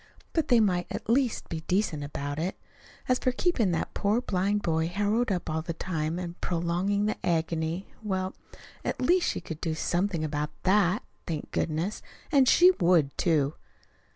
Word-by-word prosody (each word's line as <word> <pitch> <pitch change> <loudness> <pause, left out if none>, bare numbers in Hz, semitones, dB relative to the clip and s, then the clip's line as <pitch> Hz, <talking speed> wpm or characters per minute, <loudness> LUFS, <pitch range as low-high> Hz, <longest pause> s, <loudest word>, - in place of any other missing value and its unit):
But 320 -3 +1
they 240 -2 +5
might 180 -5 +2
at - - -5
least 255 -1 +1
be 165 - -4
decent 180 -6 0
about 145 0 -4
it. 180 +4 -2 0.5
As 250 0 +2
for 255 - +1
keeping 250 - +1
that 165 - -2
poor 205 +3 +1
blind 205 -2 0
boy 160 -1 +1
harrowed 205 +6 +1
up 180 -2 -2
all 160 0 -1
the 165 0 -5
time 160 -2 -2
and 175 -1 -6
prolonging 180 +4 0
the 215 - -2
agony 165 +1 -1
well, 190 -3 -2 0.5
at - - -2
least 350 +7 +3
she - - -3
could 160 -2 -7
do 160 -2 -1
something 175 +1 0
about 150 -1 -2
THAT, 190 0 +3 0.2
thank 155 -3 -4
goodness! 165 +6 -1 0.3
And 275 -4 +5
she 360 +1 +7
would, 170 -6 +3
too. 155 -4 +2
180 Hz, 170 wpm, -28 LUFS, 160-210 Hz, 0.5 s, she